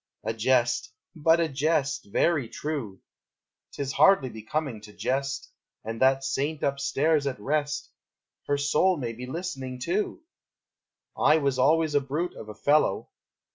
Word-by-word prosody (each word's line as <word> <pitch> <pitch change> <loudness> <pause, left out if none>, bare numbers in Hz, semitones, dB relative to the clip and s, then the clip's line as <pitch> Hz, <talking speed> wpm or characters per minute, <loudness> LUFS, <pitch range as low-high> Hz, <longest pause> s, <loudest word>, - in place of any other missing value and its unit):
A 110 +1 -1
jest, 120 +2 +1 0.2
but 160 +1 +4
a 165 - +2
jest! 145 0 0
Very 145 -2 +2
true: 135 -12 -5 0.7
'T - - -3
is 135 0 -4
hardly 190 -10 +5
becoming 115 +2 -4
to 105 0 -12
jest, 135 +3 -2 0.3
And 115 +2 -5
that 135 +1 +4
saint 145 +3 -2
up 140 0 0
stairs 145 +1 +1
at 130 -5 -3
rest, 145 +5 -2 0.6
Her 145 - +1
soul 150 +6 +2
may 120 -5 -3
be 125 +2 -8
listening, 135 -5 -5
too! 200 - -2 0.9
I 150 - +4
was 140 -4 0
always 155 +3 +3
a 145 - +3
brute 150 +6 -3
of 110 - -10
a 105 - -8
fellow! 145 -3 +2
140 Hz, 150 wpm, -27 LUFS, 125-155 Hz, 0.9 s, hardly